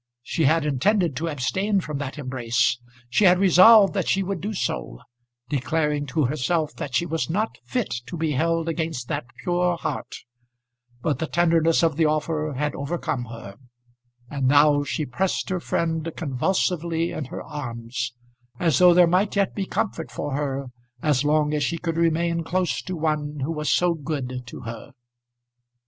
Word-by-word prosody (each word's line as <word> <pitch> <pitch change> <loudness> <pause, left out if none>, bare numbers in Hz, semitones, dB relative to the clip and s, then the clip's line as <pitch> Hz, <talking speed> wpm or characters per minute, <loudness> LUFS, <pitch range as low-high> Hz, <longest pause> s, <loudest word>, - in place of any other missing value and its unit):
She 160 +5 0
had 160 +2 +3
intended 165 - +1
to 165 +3 -2
abstain 190 +9 0
from 150 -5 -4
that 145 0 -5
embrace; 120 -3 0 0.3
she 130 - +2
had 180 -1 +6
resolved 195 +3 +7
that 190 -5 -1
she 195 - +2
would 190 -3 -3
do 205 +4 -3
so, 120 - -3 0.5
declaring 150 +2 -1
to 150 +2 +1
herself 155 +4 0
that 135 - -4
she 170 - +2
was 165 -1 -2
not 210 +7 -1
fit 245 -5 -2
to 175 - -6
be 160 -1 0
held 165 +4 0
against 160 -7 -3
that - - -2 0.2
pure 175 0 +1
heart; - - -4 0.9
but 150 - 0
the 160 - -2
tenderness 165 -1 +3
of 160 -3 +2
the 160 -2 +4
offer 155 0 -1
had 150 +1 -1
overcome 140 -3 -3
her; 110 -4 -10 0.7
and 135 -1 -1
now 145 +1 +5
she 150 +1 -2
pressed 180 +9 -1
her 185 -1 -1
friend 165 -1 -1
convulsively 165 +3 0
in 150 - -4
her - - -7
arms, 120 -4 -5 0.5
as 165 -7 +2
though 180 -1 +7
there 180 0 +7
might 185 +5 +1
yet 200 -2 +1
be 195 -2 -3
comfort 170 -7 -2
for 145 -1 -4
her 135 -2 -3 0.3
as 150 -3 +2
long 150 0 +2
as 150 -1 0
she 170 +4 -1
could 165 -1 -3
remain 170 0 +1
close 180 +1 -1
to 185 - -5
one 150 -2 -2
who 140 +5 -1
was 150 -2 -2
so 175 -1 +3
good 140 -5 -4
to - - -9
her. 115 0 -8
160 Hz, 170 wpm, -24 LUFS, 145-175 Hz, 0.9 s, resolved